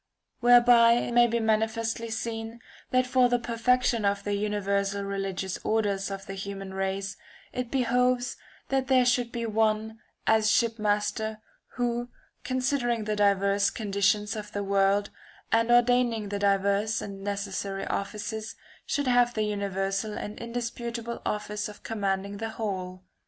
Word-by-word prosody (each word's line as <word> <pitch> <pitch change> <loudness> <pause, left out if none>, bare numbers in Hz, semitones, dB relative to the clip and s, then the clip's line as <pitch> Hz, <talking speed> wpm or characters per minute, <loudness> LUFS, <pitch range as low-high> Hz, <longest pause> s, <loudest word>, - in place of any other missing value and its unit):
Whereby 240 -1 +7
it 240 0 0
may 240 0 +6
be 235 0 0
manifestly 225 +1 0
seen 225 0 -4 0.3
that 255 0 +3
for 250 -1 +3
the 245 - +3
perfection 240 0 +1
of 200 0 +1
the 205 - -2
universal 200 -1 -1
religious 195 -1 -3
order 210 -3 +1
of 195 0 -6
the 195 - -6
human 195 0 -6
race 195 +1 -2 0.4
it 250 -1 -3
behoves 250 -1 +1 0.3
that 270 -1 0
there 260 -2 +4
should 245 -1 +2
be 235 -1 -3
one, 220 0 0 0.3
as 220 -1 +4
shipmaster, 220 -1 0 0.4
who, 240 -1 -1 0.3
considering 255 -3 0
the 210 0 -1
diverse 200 -1 +3
con 215 -3 -6
ditions 205 +2 +2
of 210 -1 -7
the 205 - -2
world, 200 +1 +2 0.4
and 230 +1 +3
ordaining 240 -3 +3
the 200 0 -3
diverse 200 +2 +2
and 195 -1 -7
necessary 200 -1 -3
offices, 215 +2 -4 0.3
should 285 - 0
have 245 -1 +3
the 215 - +1
universal 200 0 -2
and 210 - -6
indisputable 235 0 -4
office 210 0 -3
of 210 - -13
commanding 200 -2 -2
the 225 +2 -4
whole. 185 -4 -4
215 Hz, 140 wpm, -27 LUFS, 200-235 Hz, 0.4 s, Whereby